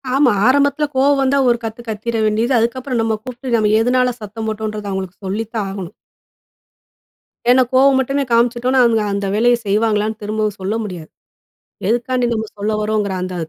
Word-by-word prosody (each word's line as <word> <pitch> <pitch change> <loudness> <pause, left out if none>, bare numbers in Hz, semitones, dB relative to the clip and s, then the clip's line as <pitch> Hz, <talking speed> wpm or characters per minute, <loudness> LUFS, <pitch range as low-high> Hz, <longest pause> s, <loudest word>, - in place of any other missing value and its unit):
ஆமா. 270 -2 +4 0.2
ஆரம்பத்துல 285 +2 +3
கோவம் 275 +1 +3
வந்தா 270 +1 +2
ஒரு 235 - +3
கத்து 225 +1 -5
கத்திற 220 +2 -3
வேண்டியது. 220 +4 +1
அதுக்கப்புறம் 245 +2 -1
நம்ம 225 -1 0
கூப்ட்டு 250 0 -6
நம்ம 215 -1 +2
எதனால 250 +1 +2
சத்தம் 220 +2 -6
போட்டோன்றத 215 -1 -4
அவுங்களுக்கு 190 0 -6
சொல்லித்தான் 215 +2 -3
ஆகணும். 195 -1 -7 1.6
ஏன்னா, 255 +1 +6
கோவம் 265 +1 +5
மட்டுமே 275 +2 0
காமிச்சிட்டோனா, 240 +2 +2
அவங்க 225 -2 +2
அந்த 200 0 -2
வேலைய 240 +3 +4
செய்வாங்களான்னு 215 +1 0
திரும்பவும் 215 0 -2
சொல்ல 195 +3 -2
முடியாது. 180 -6 -7 0.8
எதுக்காண்டி 245 +2 0
நம்ம 220 -1 -2
சொல்ல 210 +2 -1
வரோங்குற 210 -2 -1
அந்த 185 0 -4
225 Hz, 150 wpm, -18 LUFS, 210-250 Hz, 1.6 s, ஏன்னா